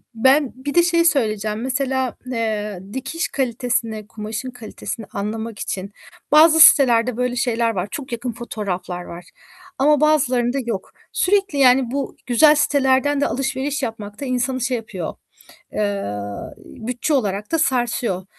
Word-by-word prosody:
ben 265 +4 +3
bir 280 +2 -5
de 345 - +6
şeyi 335 -1 +2
söyleyeceğim: 215 -7 +1
Mesela, 260 -1 -1
eee, 215 -5 -2
dikiş 270 +6 -3
kalitesini, 235 -4 -2
kumaşın 220 +4 -6
kalitesini 230 -2 -7
anlamak 220 +2 -4
için 195 +1 -4 0.4
bazı 320 +1 +7
sitelerde 250 -6 +6
böyle 250 0 -1
şeyler 235 -2 +1
var. 180 +2 -2
Çok 275 -4 -6
yakın 240 +1 -3
fotoğraflar 195 -6 -5
var 175 +1 -10 0.5
ama 295 +2 +3
bazılarında 260 -4 +2
yok. 200 -5 -4 0.2
Sürekli 390 -5 +1
yani 255 -2 +4
bu 275 0 -3
güzel 295 +6 +5
sitelerden 285 0 +2
de - - +2
alışveriş 270 +2 -2
yapmak 210 -3 -5
da - - -3
insanı 255 0 -1
şey 250 0 0
yapıyor, 195 -7 -6 0.6
eee, 205 -1 -1 0.5
bütçe 250 +6 -4
olarak 210 -5 -1
da 325 - +2
sarsıyor, 240 - 0
245 Hz, 135 wpm, -21 LUFS, 220-275 Hz, 0.6 s, bazı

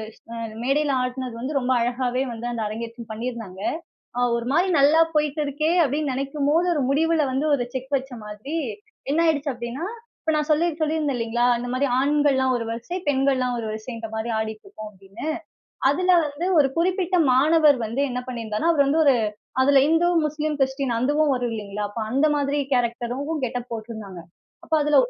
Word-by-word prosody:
ஸ் - - -26
அ - - -6 0.3
மேடையில 280 +2 +1
ஆடினது 250 -1 -4
வந்து 280 +2 -1
ரொம்ப 255 0 +1
அழகாகவே 250 +1 0
வந்து 235 +1 -5
அந்த 230 -2 -3
அரங்கேற்றம் 230 +1 -7
பண்ணியிருந்தாங்க. 220 -4 -5 0.6
அ - - 0 0.2
ஒரு 235 0 -4
மாரி 360 +4 +3
நல்லா 295 +4 +5 0.2
போயிட்டு 300 0 +1
இருக்கே 305 +4 0
அப்படின்னு 285 0 -1
நினைக்கும் 275 +2 -2
போது, 340 +3 +3
ஒரு 290 - 0
முடிவுல 315 +1 +2
வந்து 280 +4 0
ஒரு 245 -2 -2
செக் 260 +2 -5
வைச்ச 265 0 -5
மாதிரி, 215 +10 -6 0.6
என்ன 325 - +2
ஆயிடுச்சு 290 -3 +1
அப்படின்னா, 240 +8 -5 0.4
இப்ப 315 - +1
நான் 300 +1 -1
சொல்லிர் 325 +1 +1
சொல்லிருந்தேன் 305 -4 0
இல்லங்களா, 235 +1 +1
இந்த 245 - -5
மாரி 280 +2 +1
ஆண்கள்லாம் 275 -2 +2
ஒரு 230 - -4
வரிசை, 295 +11 -4
பெண்கள்லாம் 265 -2 +1
ஒரு 220 - -5
வரிசைன்ற 225 +1 -6
மாரி 225 +2 -2
ஆடிட்டு 220 0 -5
இருக்கோம் 215 -1 -9
அப்படின்னு. 195 +8 -10 0.6
அதுல 365 +6 +3
வந்து, 295 +5 -4
ஒரு 275 -2 +5
குறிப்பிட்ட 365 +1 +1 0.2
மாணவர் 295 +1 +5
வந்து 235 +6 -3
என்ன 250 0 -2
பண்ணிருந்தாருனா, 230 +5 -1
அவரு 285 -3 +4
வந்து 315 +3 +3
ஒரு 265 -3 +6 0.4
அதுல 275 0 +5
இந்து, 325 +2 +3 0.2
முஸ்லீம், 300 0 -1
கிறிஸ்டின் 265 -1 0
அதுவும் 290 +6 +2
வரும் 245 -2 -1
இல்லங்களா? 210 -1 -5
அப்ப 205 +3 -6
அந்த 275 +5 +3
மாரி 285 0 0
கேரக்டரும் 245 +3 -1 0.2
கெட் 245 0 -2
அப் 245 - -9
போட்ருந்தாங்க. 220 -5 -7 0.4
அப்போ 320 - -1
அதுல 295 0 +3
265 Hz, 175 wpm, -24 LUFS, 235-300 Hz, 0.6 s, ஒரு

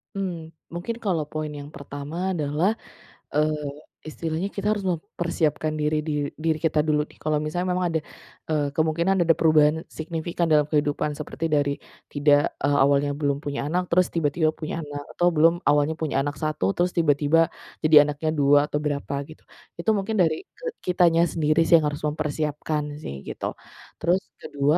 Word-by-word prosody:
Hmm, 175 -5 -4 0.2
mungkin 175 +7 -4
kalau 180 -8 0
poin 155 +1 -4
yang 145 0 -8
pertama 150 +7 -4
adalah, 155 +8 +1 0.6
eee, 150 0 +1 0.4
istilahnya 160 +4 -3
kita 205 +1 -1
harus 205 -2 -2
mempersiapkan 165 -3 -1
diri 150 0 0
dir 150 -2 -1
diri 160 0 +1
kita 160 -2 +1
dulu 150 -1 +3
nih - - -20
kalau 155 0 0
misalnya 175 +4 -2
memang 180 0 0
ada, 160 -1 0 0.5
eee, 150 -2 +1
kemungkinan 170 +4 +2
ada 165 - +5
perubahan 155 -1 +4
signifikan 165 +2 -3
dalam 150 -1 +3
kehidupan 150 0 0
seperti 160 +2 -4
dari 145 -2 +2 0.4
tidak, 145 0 +3
eee, 145 0 +2
awalnya 140 +1 +3
belum 140 -1 0
punya 140 -1 -3
anak 180 +4 -1
terus 180 +1 +2
tiba-tiba 155 0 +1
punya 160 0 -5
anak, 145 0 -6 0.2
atau 175 0 +3
belum, 165 +1 +5
awalnya 145 +2 +3
punya 150 -4 0
anak 145 +1 -3
1, 150 -12 -1
terus 180 +1 +1
tiba-tiba 160 0 +3 0.3
jadi 155 -2 +7
anaknya 150 +2 -2
2 145 -1 +4
atau 145 - -1
berapa 145 -1 -2
gitu. 155 +2 -14 0.4
Itu 195 - -1
mungkin 200 +1 0
dari, 160 -2 +1
eee, 480 -2 -7
kitanya 170 -2 +4
sendiri 160 0 +2
sih - - +2
yang 150 - +1
harus 145 +1 -5
mempersiapkan 150 0 -2
sih 70 - -7
gitu. - - -5 0.4
Terus 175 +3 +2 0.2
ke-2 145 +3 0
155 Hz, 165 wpm, -24 LUFS, 145-170 Hz, 0.6 s, jadi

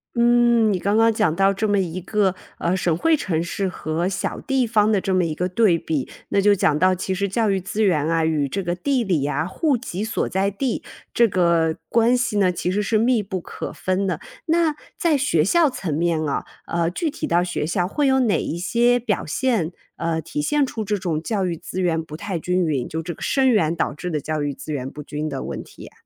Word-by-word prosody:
嗯， 235 -2 +4
你 195 - +1
刚 200 +4 0
刚 225 0 +5
讲 210 -7 +1
到 195 +2 +4
这 210 +3 -1
么 205 -1 +2
一 180 -1 -2
个， 190 0 0 0.2
呃， 175 +2 0
省 170 -3 +1
会 315 - +2
城 165 - -1
市 190 +3 -2
和 165 -1 -2
小 190 - -3
地 265 -3 0
方 215 -1 +3
的 200 -3 +2
这 195 - -2
么 180 - +2
一 160 - -2
个 180 +4 -2
对 190 -1 +3
比， 150 -5 -2 0.2
那 - - +2
就 205 +1 +5
讲 155 -6 +2
到 185 +3 +4
其 185 +1 -2
实 200 +2 0
教 215 +3 +1
育 195 -1 +1
资 195 +4 -3
源 160 -7 +2
啊 165 0 +1
与 155 -3 +1
这 195 +9 -3
个 175 -1 -2
地 255 +6 0
理 170 -9 0
呀、 150 +3 -1
户 285 - +1
籍 215 -5 -4
所 220 - -1
在 195 +1 0
地， 235 +4 -2 0.3
这 235 - +5
个 170 -4 +2
关 235 +2 +4
系 240 -4 0
呢 185 -2 +3
其 175 - -2
实 205 +3 0
是 215 +2 +1
密 235 -1 +2
不 190 -2 -4
可 - - -7
分 185 +1 -1
的。 180 -5 -1 0.3
那 325 -2 +2 0.2
在 335 -7 +3
学 170 - +2
校 325 - +4
层 250 - -4
面 165 -1 +1
啊， - - -2 0.2
呃， 170 0 0
具 315 - -1
体 - - -4
到 175 +1 +2
学 175 -4 -2
校 175 +2 0
会 290 +8 0
有 265 -1 +4
哪 225 -5 +2
一 - - -3
些 240 +6 +2
表 220 -4 -1
现， 195 - 0 0.2
呃， 165 -1 -1
体 150 -2 -4
现 295 - +2
出 225 -5 -3
这 210 +1 0
种 175 -5 -2
教 205 -1 -1
育 170 -2 -3
资 185 +3 -5
源 165 -2 +1
不 155 -1 -9
太 175 +2 -4
均 180 +3 0
匀， 140 -5 -1
就 160 +1 -4
这 170 -1 -6
个 - - -17
生 265 -1 +3
源 170 -9 +2
导 165 - 0
致 180 +3 -5
的 155 - -1
教 155 +1 -2
育 145 -1 -1
资 155 - -8
源 135 -3 -3
不 150 - -8
均 150 +1 -4
的 140 -3 -4
问 - - -5
题 - - -16
呀？ - - -13
185 Hz, 260 characters per minute, -22 LUFS, 165-225 Hz, 0.3 s, 刚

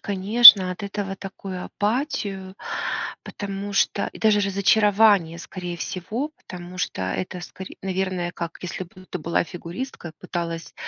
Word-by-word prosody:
конечно, 200 -1 +8
от 180 - -10
этого 200 -1 -4
такую 190 -1 -7
апатию, 205 -5 -3 0.7
потому 200 0 -6
что, 200 0 +1
и - - -11
даже 215 -2 +3
разочарование, 200 -3 +3
скорее 175 0 -6
всего, 220 - -4
потому 180 0 -10
что 95 - -2
это 180 - -3
скоре 185 +1 -9
наверное, 185 -2 -2
как 170 -1 -6
если 180 +1 -5
бы 185 +2 -17
ты 180 - -5
была 170 +2 0
фигуристка 175 +5 -7
и - - -11
пыталась, 165 -1 -5
190 Hz, 140 wpm, -23 LUFS, 175-205 Hz, 0.7 s, конечно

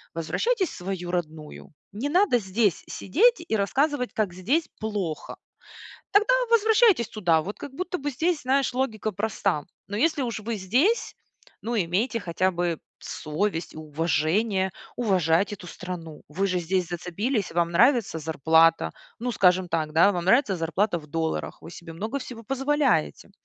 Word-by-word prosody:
возвращайтесь 375 - 0
в - - -10
свою 180 -1 -4
родную. 160 -4 -5 0.2
Не 230 +9 -3
надо 355 -6 +3
здесь 200 -1 0
сидеть 445 - +2
и - - 0
рассказывать, 255 +6 0
как 210 -5 -1
здесь 250 - 0
плохо. 205 -7 -4 0.7
Тогда 430 +5 +4 0.2
возвращайтесь 440 - +4
туда. 175 -7 +2
Вот 205 +6 -6
как 280 - -8
будто 365 +3 -3
бы 290 +1 -3
здесь, 320 +4 0
знаешь, 265 0 +1
логика 220 -4 -1
проста. 195 -5 -1 0.2
Но 205 - -5
если 300 +4 +2
уж 230 -4 -3
вы 225 +1 -3
здесь, 255 - +1 0.5
ну, 235 +1 -2
имейте 210 +6 0
хотя 185 0 0
бы 175 -2 -1 0.2
совесть 165 +2 -3
и - - -9
уважение- 165 +6 0 0.3
уважать 190 -3 +2
эту 185 -3 -12
страну. 170 -4 -8
Вы 185 +7 -1
же 185 -2 0
здесь 180 +1 -1
зацепились, 190 +6 -2
вам 170 0 +1
нравится 235 - +3
зарплата. 160 - +3 0.3
Ну, 245 +1 -2
скажем 185 -3 +3
так, 160 -2 -1
вам 175 +1 +4
нравится 210 +2 +4
зарплата 175 +3 0
в 150 - -13
долларах, 160 +2 -3
вы - - -10
себе 170 -1 -10
много 220 +11 -3
всего 245 -3 -9
позволяете. 270 - 0
195 Hz, 150 wpm, -25 LUFS, 170-250 Hz, 0.7 s, Тогда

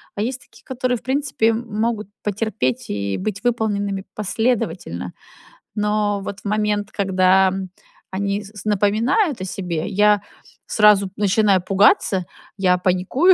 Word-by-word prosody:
а 205 - -3
есть 250 +4 -2
такие, - - -20
которые, 255 -1 -1
в - - -16
принципе, 265 -4 +1
могут 225 -1 -2 0.2
потерпеть 205 - -2
и 100 -1 -2
быть 200 +2 -4
выполненными 205 -5 -1
последовательно. 185 - -2 0.6
Но 210 -1 0
вот 200 0 -6
в - - -30
момент, 210 0 0
когда 190 -1 +3 0.6
они 200 +2 -2
с 200 - -11
с - - -13
напоминают 220 - +2
о - - -3
себе, 180 -2 -3
я 210 0 +3 0.5
сразу 210 -2 +4
начинаю 205 -2 +3
пугаться, 195 -1 +3 0.3
я 180 -2 +3
паникую:" 185 - +3
205 Hz, 130 wpm, -21 LUFS, 190-220 Hz, 0.6 s, сразу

